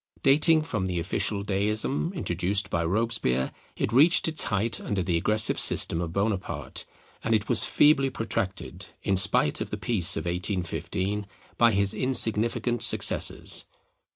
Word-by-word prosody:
Dating 155 +3 +3
from 105 -12 -4
the 90 -1 -4
official 100 +3 -2
Deism 105 - -2
introduced 95 - -2
by 85 - -1
Robespierre, 90 - -1 0.2
it 110 - -3
reached 155 +8 +4
its 160 -1 +1
height 110 +2 -2
under 100 -3 -3
the 85 -1 -2
aggressive 105 +6 +3
system 80 - +3
of 85 -2 -5
Bonaparte, 100 +1 -4 0.4
and 115 - +1
it 105 -1 -2
was 120 - +2
feebly 140 -2 +3
protracted, 100 -6 -5 0.2
in 100 - 0
spite 95 +1 +1
of - - -5
the 105 - -5
peace 100 -2 -1
of - - -5
1815, 95 +2 -4 0.3
by 115 -1 +3
his 100 -1 0
insignificant 120 -1 +1
successors. - - +3
105 Hz, 145 wpm, -25 LUFS, 95-115 Hz, 0.4 s, reached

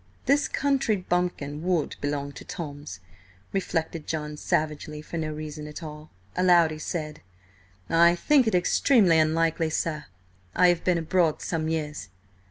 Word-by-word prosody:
This 280 +3 +3
country 275 -5 +1
bumpkin 175 -6 -2
would 175 -3 0
belong 145 -1 -2
to - - -10
Tom's, 145 - -7 0.5
reflected 165 -4 -2
John 150 -1 -3
savagely, 150 0 -2
for 165 +2 -6
no 155 -1 -2
reason 150 0 -6
at 150 +3 -8
all. 150 0 -9 0.3
Aloud 175 -3 +5
he 155 - -6
said: 155 -1 -4 0.7
"I 170 +4 +5
think 270 - +3
it 220 - +2
extremely 180 -1 +4
unlikely, 160 +1 +1
sir. 155 -1 -2 0.5
I 180 - +6
have 175 -1 +1
been 180 -2 +2
abroad 165 -1 +1
some 160 -2 -2
years." 150 -8 -3
160 Hz, 145 wpm, -26 LUFS, 150-180 Hz, 0.7 s, I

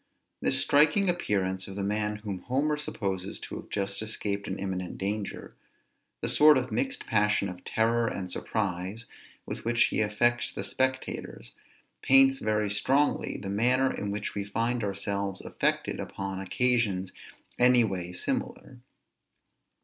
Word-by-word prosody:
This 135 - +2
striking 155 +9 +4
appearance 95 - -1
of 95 - -8
the 100 - -3
man 105 +1 -1
whom 105 -3 -5
Homer 140 +7 0
supposes 100 -10 -3
to - - -6
have - - -10
just 100 0 -1
escaped 105 -2 -3
an 95 - -3
imminent 95 -2 -4
danger, 100 +1 -4 0.7
the - - -1
sort 150 -1 +6
of 130 -1 -2
mixed 265 0 -1
passion 105 -2 +2
of 90 0 -9
terror 115 +1 +1
and 95 -4 -4
surprise, 100 +3 -2 0.4
with - - -6
which 120 0 +3
he - - +1
affects 120 +3 +1
the - - -5
spectators, 130 - -2 0.5
paints 135 0 +5
very 105 -1 0
strongly 135 +8 +1
the 95 - -6
manner 125 +6 +2
in 100 - -4
which 100 +1 -3
we 100 - -2
find 115 +4 -1
ourselves 100 -1 -2
affected - - -1
upon 95 -1 -4
occasions 100 -2 +1 0.5
any 125 0 +6
way 90 -4 -3
similar. 90 - -3
105 Hz, 140 wpm, -28 LUFS, 100-125 Hz, 0.7 s, sort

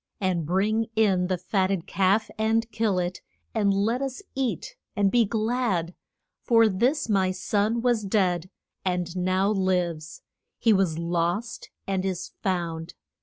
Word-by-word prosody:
And 180 -5 0
bring 215 +5 +1
in 195 -5 +3
the 185 0 0
fat 185 +2 0
ted 190 -4 -2
calf, 200 +3 +1
and 220 +1 +2
kill 215 -3 0
it, 180 0 -2 0.3
and 205 -3 +2
let 215 +6 +1
us 270 +6 -4
eat 255 - -2 0.2
and 200 -1 +2
be 240 -2 +4
glad. 215 -5 0 0.5
For 230 -2 +5
this 235 +10 +1
my 195 -4 +2
son 205 +5 0
was 240 -3 +2
dead, 185 -3 +1 0.3
and 180 -1 -1
now 185 +2 +1
lives; 180 -5 -1 0.3
he 225 -2 +4
was 190 -5 +1
lost 175 +7 -2 0.2
and 190 -1 -1
is 185 -1 -3
found. 170 -3 -2
195 Hz, 145 wpm, -26 LUFS, 180-220 Hz, 0.5 s, For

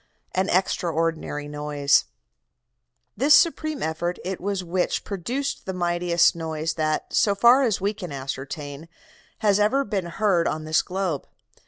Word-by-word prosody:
AN 185 +1 0
EXTRAORDINARY 165 -4 -1
NOISE 145 - +1 1.1
"This 285 +3 +6
supreme 310 -3 +2
effort 170 +3 -2
it 190 0 -4
was 195 0 -2
which 180 +1 -1
produced 240 +9 -4
the 190 - -2
mightiest 175 -1 +2
noise 160 -1 -3
that, 155 -1 -2
so 200 -1 +3
far 240 +6 +6
as 230 -7 +1
we 200 +2 0
can 185 -6 -8
ascertain, 140 +3 -6 0.5
has 205 -2 +3
ever 225 +7 +3
been 200 -7 -3
heard 175 -2 +1
on 155 0 -2
this 155 0 +2
globe. 185 -6 -3
175 Hz, 140 wpm, -24 LUFS, 155-200 Hz, 1.1 s, This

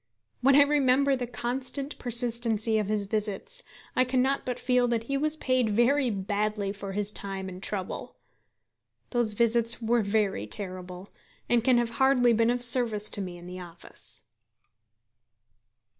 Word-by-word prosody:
When 270 +2 +5
I 285 - +8
remember 280 -1 +3
the 250 -2 -4
constant 255 +4 -4
persistency 235 -2 0
of 210 - -2
his 210 -1 -1
visits, 215 - -2 0.3
I 255 - +4
cannot 260 +2 0
but 250 -1 -2
feel 250 -1 +2
that 235 -2 0
he 275 +4 -3
was 305 +2 0
paid 255 -6 +1
very 245 +5 +2
badly 205 0 -2
for 200 -1 -7
his 205 +1 -1
time 195 -2 -4
and 185 0 -8
trouble. 195 -2 -5 1.0
Those 235 -4 +1
visits 235 0 +3
were 235 0 +1
very 200 - 0
terrible, 185 - -7 0.4
and 240 -2 +2
can 250 0 +4
have 240 -1 0
hardly 250 -3 +4
been 230 +1 +2
of 245 0 +1
service 235 -4 +1
to 205 - -2
me 180 -2 -6
in 175 - -12
the 180 +1 -8
office. 175 -1 -11
230 Hz, 155 wpm, -27 LUFS, 205-250 Hz, 1.0 s, I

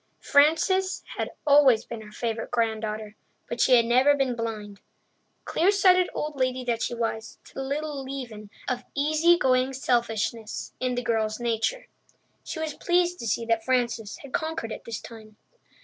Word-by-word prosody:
Frances 325 +6 +3
had - - -2 0.2
always 275 -6 +5
been 230 -2 -7
her 210 -1 -12
favourite 225 0 -3
granddaughter, 220 -2 -2 0.3
but 235 0 -3
she 255 - +6
had 235 -1 +5
never 255 +5 +4
been 265 -3 0
blind, 215 -3 -5 0.6
clear 350 +4 +2
sighted 370 -3 +4
old 300 0 -3
lady 255 0 0
that 235 -2 -1
she 240 - -1
was, 225 -1 -3
to - - -17
the - - -5
little 285 +1 -3
leaven 245 -6 -7 0.2
of 250 0 -2
easy 310 +4 +4
going 260 -4 +2
selfishness 235 -3 -1
in 255 -1 -1
the 245 - -2
girl's 220 -1 0
nature. 240 - -1 0.6
She - - -6
was 315 -1 -3
pleased 355 +1 +1
to 230 - -5
see 230 +2 0
that 230 -1 +1
Frances 235 -4 -1
had 280 - -11
conquered 320 -8 -2
it - - -7
this 230 -1 -5
time. 215 -2 -12
245 Hz, 165 wpm, -26 LUFS, 225-290 Hz, 0.6 s, she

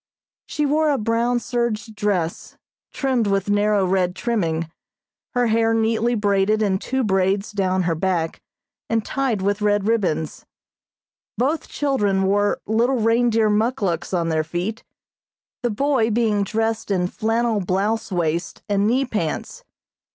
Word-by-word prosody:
She 300 - -1
wore 305 +2 +2
a 285 - +2
brown 235 +2 +1
serge 235 -2 -2
dress, 200 -6 -2 0.3
trimmed 255 -5 0
with 195 0 0
narrow 205 -1 +2
red 180 -1 +1
trimming, 170 -9 -1 0.7
her 245 0 +3
hair 225 0 +2
neatly 225 +1 +1
braided 205 0 +2
in 190 -2 +1
two 265 +4 -1
braids 195 0 +1
down 190 -2 0
her 170 -1 +1
back, 165 -1 -1 0.5
and 225 -1 0
tied 260 -8 -1
with 205 +1 0
red 205 -1 +1
ribbons. 175 -9 -1 0.9
Both 285 +6 0
children 205 -10 0
wore 205 +1 +1
little 235 +5 +2
reindeer 225 -1 +2
muckluks 210 -6 0
on 170 -3 0
their 160 -1 +1
feet, 175 +8 -4 0.8
the 240 - 0
boy 250 0 +1
being 215 -2 +1
dressed 225 +2 -1
in 185 -3 +1
flannel 225 +2 0
blouse 200 +4 -1
waist 170 -1 -2
and 205 0 +1
knee 260 +4 +2
pants. 190 -11 -3
210 Hz, 135 wpm, -22 LUFS, 190-230 Hz, 0.9 s, her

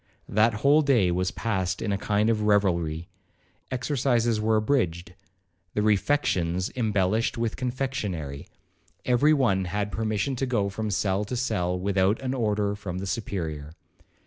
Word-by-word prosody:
That 110 +2 +3
whole 145 +2 +6
day 120 -11 +3
was 90 +1 0
passed 95 -4 -2
in 105 - -2
a - - +1
kind 105 +2 +1
of 110 -1 0
revelry. 85 -6 +1 0.6
Exercises 120 -4 0
were 110 +1 +2
abridged,—the 95 -4 -3
refections 95 -6 +1
embellished 110 -2 +1
with 115 -1 -1
confectionary,—every 125 - -2
one 100 -9 +2
had 100 +3 -2
permission 110 +4 -1
to 135 - -1
go 105 -5 0
from 110 +2 -3
cell 100 0 0
to 125 - -4
cell, 90 -7 -1
without 100 +2 +1
an 130 0 -1
order 105 -4 0
from 95 -3 -6
the 95 - -4
Superior. 80 -7 -4
105 Hz, 135 wpm, -26 LUFS, 95-115 Hz, 0.6 s, whole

